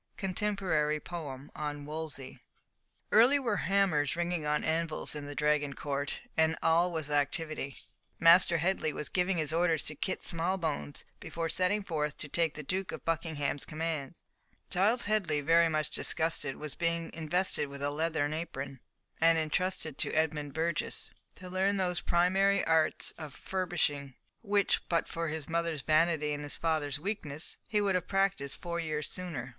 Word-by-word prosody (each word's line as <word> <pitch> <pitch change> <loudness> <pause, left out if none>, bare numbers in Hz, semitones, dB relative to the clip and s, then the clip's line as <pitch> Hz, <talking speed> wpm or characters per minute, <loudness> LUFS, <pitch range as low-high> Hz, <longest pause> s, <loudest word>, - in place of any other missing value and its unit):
Contemporary 185 -6 0
Poem 145 -5 -7
on 145 -1 -4
Wolsey. 150 -4 -6 0.7
Early 240 +6 +6
were 235 -7 0
hammers 185 -9 +2
ringing 170 -2 -1
on 150 0 +1
anvils 160 0 +4
in 150 -1 -5
the 145 - -7
Dragon 150 -1 +1
Court, 140 0 -3
and 160 0 +3
all 170 +2 +4
was 155 -3 -3
activity. 145 0 -1 0.4
Master 170 +1 +6
Headley 165 -2 0
was 150 - -5
giving 180 0 +1
his 155 -1 0
orders 165 -2 +2
to 150 - -3
Kit 185 - -3
Smallbones 165 -4 -2
before 165 0 -4
setting 185 +5 +1
forth 150 -5 -2
to 150 - -3
take 165 +1 0
the 150 - -6
Duke 185 +6 -2
of - - -8
Buckingham's 160 -4 -1
commands; 155 -2 -4 0.5
Giles 210 +7 +3
Headley, 200 -8 +1
very 165 +3 +4
much 155 -1 -1
disgusted, 160 -4 0
was 150 -2 -5
being 170 -1 -2
invested 165 0 0
with 140 0 -7
a 145 - 0
leathern 155 -1 0
apron, 140 -4 -5 0.4
and 165 0 +5
entrusted 160 -1 -1
to - - 0
Edmund 150 -3 0
Burgess 165 0 -1 0.2
to 185 - -10
learn 190 +2 +1
those 180 -2 0
primary 195 +3 +3
arts 160 -1 +2
of 155 -4 -8
furbishing 150 -8 -2 0.3
which, 205 -3 +2
but 170 -1 +1
for 165 0 -3
his 155 -2 -4
mother's 165 -3 -1
vanity 155 -1 +2
and 145 - -4
his 145 -1 -3
father's 155 -3 0
weakness, 155 -4 -2
he 210 - +1
would 200 -2 +2
have 180 - -1
practised 195 -8 0
four 170 -1 -3
years 155 -2 -2
sooner. 160 -10 -5
160 Hz, 160 wpm, -31 LUFS, 150-180 Hz, 0.7 s, Early